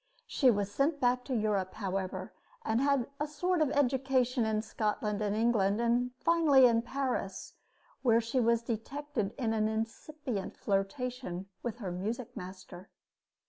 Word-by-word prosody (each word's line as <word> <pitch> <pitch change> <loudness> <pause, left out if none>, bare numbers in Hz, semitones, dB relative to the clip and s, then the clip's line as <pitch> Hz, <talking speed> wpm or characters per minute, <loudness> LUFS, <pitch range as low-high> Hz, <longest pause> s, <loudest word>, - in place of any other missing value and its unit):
She 265 - +3
was 205 -3 +1
sent 285 +6 +1
back 250 0 +2
to 260 - -2
Europe, 205 -4 0
however, 195 -2 -3 0.3
and 225 +3 +1
had 275 -3 +2
a 295 - -1
sort 345 +4 0
of 305 - +3
education 260 -3 +2
in 215 0 0
Scotland 210 -1 -1
and 205 -1 0
England, 215 -3 +2
and 240 +1 +2
finally 305 -5 +5
in 230 -2 +4
Paris, 250 -5 -3 0.5
where 230 -3 +4
she 235 +3 -1
was 235 -1 +3
detected 235 0 -3
in 230 -5 0
an 215 -1 +2
incipient 225 +1 -4
flirtation 195 -1 -2
with 235 -2 -4
her 200 -7 -4
music 215 +7 -4
master. 185 0 -9
235 Hz, 145 wpm, -31 LUFS, 210-265 Hz, 0.5 s, finally